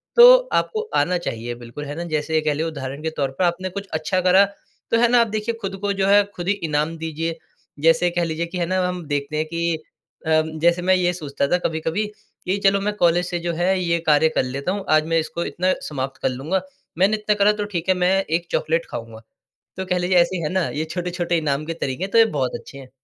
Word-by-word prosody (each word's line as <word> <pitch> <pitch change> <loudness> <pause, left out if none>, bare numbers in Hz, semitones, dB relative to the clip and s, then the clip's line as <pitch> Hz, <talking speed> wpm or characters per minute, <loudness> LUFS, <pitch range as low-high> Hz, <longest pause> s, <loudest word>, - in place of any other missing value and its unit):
तो - - +10 0.2
आपको 435 -1 +1
आना 180 0 +2
चाहिए, 120 -7 -4
बिल्कुल, 120 +5 -8
है 145 +1 -6
ना? 170 - -4
जैसे 155 +1 -1
ये 155 - +3
कह 150 -1 +1
लें, 155 +3 -2
उदाहरण 140 -3 -5
के 160 - 0
तौर 135 -2 0
पर, 160 +7 -2
आपने 185 +2 -1
कुछ 200 +2 -6
अच्छा 155 +4 0
करा, 185 +2 +6 0.5
तो 230 - +4
है 240 - +5
ना, 245 0 +4
आप 230 - +2
देखिए, 215 +2 -2
खुद 195 -1 -4
को 205 0 0
जो 195 0 0
है, 205 +1 +6
खुद 175 0 -5
ही 200 - +4 0.2
इनाम 150 +2 0
दीजिए। 165 +1 -3 0.5
जैसे 165 +2 +4
कह 175 0 0
लीजिए 165 +1 -2
कि 180 +2 -7
है 170 - 0
ना, 185 +2 0
हम 180 -2 -4
देखते 145 +1 -2
हैं 155 - 0
कि 170 0 -2 0.4
अम, 155 0 +2
जैसे 170 +2 +3
मैं 185 +1 +3
ये 180 -1 +2
सोचता 140 -4 -2
था 180 - +4
कभी-कभी 160 +6 -1
कि, 210 -2 -6
"चलो, 195 0 +4
मैं 210 +1 -1
कॉलेज 175 0 +3
से 175 -1 -2
जो 170 0 -2
है, 175 +2 0
ये 170 -1 +1
कार्य 155 +1 +5
कर - - +3
लेता 140 +7 -3
हूँ। 200 -1 -3
आज 155 0 +4
मैं 165 0 +2
इसको 170 +2 -3
इतना 185 +1 0
समाप्त 135 -2 -5
कर - - +2
लूँगा। 155 +9 -2 0.4
मैंने 200 +4 +3
इतना 210 0 0
करा, 205 +1 +4
तो 210 -1 -3
ठीक 170 +2 -2
है, 185 - +5
मैं 185 +2 +2
एक 170 +2 -2
चॉकलेट 165 +1 0
खाऊँगा।" 115 -1 -7 0.6
तो 190 - -3
कह 180 -1 0
लीजिए, 180 +1 +2
ऐसे 175 +2 +3
है 150 - -1
ना, 185 -2 +1
ये 155 +2 -3
छोट-छोटे 175 -1 -1
इनाम 150 -1 -1
के 165 - -3
तरीके 140 +1 -3
हैं, 195 - -4
तो - - +3
ये 225 - +8
बहुत 130 -2 -1
अच्छे 140 - -13
हैं। 130 -2 -11
170 Hz, 245 wpm, -22 LUFS, 155-185 Hz, 0.6 s, तो